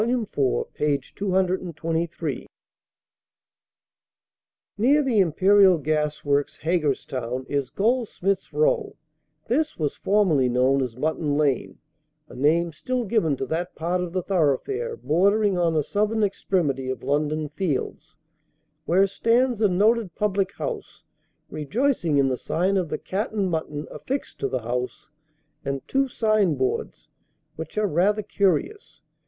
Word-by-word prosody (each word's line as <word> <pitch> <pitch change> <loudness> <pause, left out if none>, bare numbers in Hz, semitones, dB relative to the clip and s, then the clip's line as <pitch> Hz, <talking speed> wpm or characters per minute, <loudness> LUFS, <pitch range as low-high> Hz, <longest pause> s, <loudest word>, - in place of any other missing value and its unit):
iv., 235 -2 -1 0.4
p. 150 -1 +1
223: 170 -3 -2 2.3
"Near 285 +7 +4
the 245 -6 +2
Imperial 190 +2 +5
Gas 150 0 -1
Works, 140 0 0
Haggerston, 130 -6 -1
is 140 -3 -1
Goldsmith's 200 -4 0
row; 465 -3 +1 0.5
this 305 +5 0
was 150 -3 -2
formerly 180 -11 +2
known 130 +3 +2
as 125 -3 -3
Mutton 150 0 -1
Lane, 145 -4 0 0.5
a - - -13
name 165 +6 +2
still 250 - -2
given 190 - +1
to 135 - -3
that 170 +6 -3
part 175 +3 -1
of 180 -1 -4
the 185 0 -2
thoroughfare 200 - 0
bordering 200 - +2
on 165 -2 +2
the 155 - +2
southern 215 +6 0
extremity 160 -9 0
of 130 - -4
London 150 +3 0
Fields, 150 -3 -3 0.7
where 190 +4 +4
stands 230 +4 +1
a 210 - +4
noted 210 0 +2
public 195 -2 0
house 450 -4 -6 0.5
rejoicing 170 - 0
in 135 -1 +4
the 130 -1 -1
sign 185 +4 0
of 180 -4 0
the - - -2
'Cat 205 +4 -3
and 195 -4 0
Mutton' 155 -2 -3
affixed 270 +2 -5
to 135 - 0
the 130 -3 -3
house, 125 +5 -4 0.5
and 140 -1 -4
two 270 0 +1
sign 215 - +2
boards, 130 -1 -3 0.4
which 160 +6 -8
are 215 - +2
rather 200 +4 +2
curious. 330 - -1
180 Hz, 130 wpm, -24 LUFS, 150-210 Hz, 2.3 s, Imperial